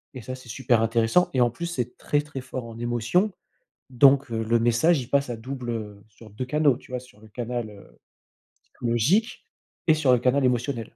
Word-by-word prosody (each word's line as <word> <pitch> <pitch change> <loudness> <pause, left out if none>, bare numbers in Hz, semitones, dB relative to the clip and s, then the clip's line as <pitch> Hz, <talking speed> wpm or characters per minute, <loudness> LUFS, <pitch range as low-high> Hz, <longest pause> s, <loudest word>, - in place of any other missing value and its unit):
Et 130 - -7
ça, 130 - -6
c'est 130 -2 -11
super 120 -1 +1
intéressant 115 +9 +2
et - - +2
en 120 -1 +3
plus, 170 +8 -5
c'est 125 -8 -4
très, 145 - 0
très 145 -3 -8
fort 125 -1 -6
en 115 0 -10
émotion. 120 - +1 0.6
Donc, 135 +1 +5
heu, 115 -1 -2
le 115 +1 +2
message 120 +8 +3
il 125 - -8
passe 140 -1 +1
à 120 - -3
double, 125 +1 -6
heu, 105 -3 -6
sur 110 +1 -16
2 105 +5 -5
canaux, 145 0 +2
tu 130 - -17
vois? 125 - -2
Sur 125 -4 -19
le 110 - -16
canal, 120 0 -4
heu, 100 -1 -16 0.7
psychologique 130 - 0 0.4
et 160 - +5
sur 155 -4 +2
le 125 - +6
canal 130 +3 +2
émotionnel. 125 -2 -1
125 Hz, 210 wpm, -25 LUFS, 115-140 Hz, 0.7 s, le